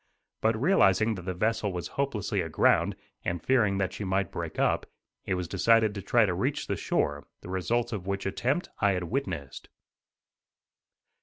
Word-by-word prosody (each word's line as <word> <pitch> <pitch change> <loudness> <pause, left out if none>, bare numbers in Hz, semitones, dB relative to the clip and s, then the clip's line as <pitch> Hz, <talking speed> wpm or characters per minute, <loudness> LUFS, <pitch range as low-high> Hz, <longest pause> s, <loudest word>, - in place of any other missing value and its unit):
But 110 0 +2
realizing 110 - +4
that 95 - -6
the 95 -1 -3
vessel 110 +2 0
was 90 -1 -4
hopelessly 135 -8 -1
aground, - - +2 0.3
and 85 0 -1
fearing 105 -2 +2
that 95 -1 -1
she - - -5
might 95 -2 0
break - - -5
up, - - +1 0.4
it 95 - 0
was 90 -1 -3
decided 110 +4 +3
to 100 - -5
try 115 +3 +3
to 95 - 0
reach - - -1
the - - -1
shore, 75 0 -1
the - - -10
result 115 +6 0
of 95 -3 -5
which 100 0 -2
attempt 130 - -1
I 100 -2 +3
had 90 -1 -2
witnessed. 90 - -4
100 Hz, 170 wpm, -28 LUFS, 90-115 Hz, 0.4 s, realizing